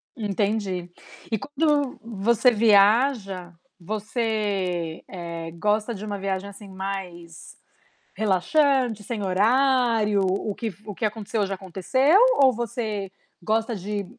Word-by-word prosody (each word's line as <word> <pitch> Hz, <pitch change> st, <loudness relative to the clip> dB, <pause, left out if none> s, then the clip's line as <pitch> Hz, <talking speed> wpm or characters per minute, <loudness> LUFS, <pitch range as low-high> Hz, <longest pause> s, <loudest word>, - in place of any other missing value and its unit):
Entendi. 200 Hz, -4 st, -2 dB, 0.4 s
E 220 Hz, -, +1 dB
quando 290 Hz, +1 st, 0 dB
você 230 Hz, +2 st, +2 dB
viaja, 210 Hz, -3 st, +3 dB, 0.3 s
você, 200 Hz, -4 st, -2 dB
eh, 170 Hz, -2 st, -6 dB
gosta 210 Hz, +6 st, 0 dB
de 200 Hz, -, -8 dB
uma 205 Hz, -1 st, -4 dB
viagem, 195 Hz, 0 st, -3 dB
assim, 200 Hz, +1 st, -12 dB
mais 190 Hz, -4 st, -7 dB, 0.6 s
relaxante, 235 Hz, -, +2 dB
sem 215 Hz, 0 st, -4 dB
horário, 225 Hz, +1 st, +2 dB
o 195 Hz, +2 st, -1 dB
que 220 Hz, -4 st, -4 dB
o 210 Hz, -1 st, -7 dB
que 220 Hz, -, -5 dB
aconteceu 215 Hz, -1 st, -1 dB
ja 195 Hz, -, -3 dB
aconteceu, 200 Hz, -, +2 dB, 0.2 s
ou 265 Hz, -, +6 dB
você 215 Hz, -4 st, -3 dB, 0.3 s
gosta 220 Hz, +5 st, 0 dB
de 200 Hz, +2 st, -4 dB
210 Hz, 115 wpm, -24 LUFS, 190-230 Hz, 0.6 s, ou